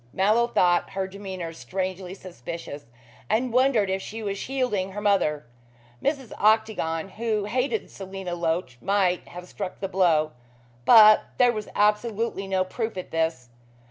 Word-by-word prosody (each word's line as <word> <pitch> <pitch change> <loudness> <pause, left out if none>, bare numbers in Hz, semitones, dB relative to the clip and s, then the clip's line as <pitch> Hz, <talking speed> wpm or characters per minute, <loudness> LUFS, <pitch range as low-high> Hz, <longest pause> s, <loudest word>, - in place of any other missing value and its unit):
Mallow 215 +5 +3
thought 175 -6 +2
her 195 0 -1
demeanor 190 -3 -6
strangely 185 +1 -4
suspicious, 165 -5 -8 0.4
and 235 +2 +1
wondered 250 -5 +3
if 190 0 -1
she 220 +3 -7
was 200 -1 -2
shielding 210 -6 -2
her 205 - -4
mother. 190 -9 +1 0.6
Mrs. 275 -5 -1
Octagon, 210 -6 +1
who 215 0 -2
hated 255 - -1
Selina 190 -2 -6
Loach, 165 -7 -2
might 190 -2 +1
have 180 +1 -10
struck 190 -1 -6
the 195 - -2
blow, 170 -5 +2 0.5
but 215 - +8
there 245 -1 +5
was 215 -2 -5
absolutely 210 -1 +1
no 190 -1 +1
proof 220 +3 -4
of 185 - -6
this. 160 -6 -1
195 Hz, 140 wpm, -25 LUFS, 180-220 Hz, 0.6 s, but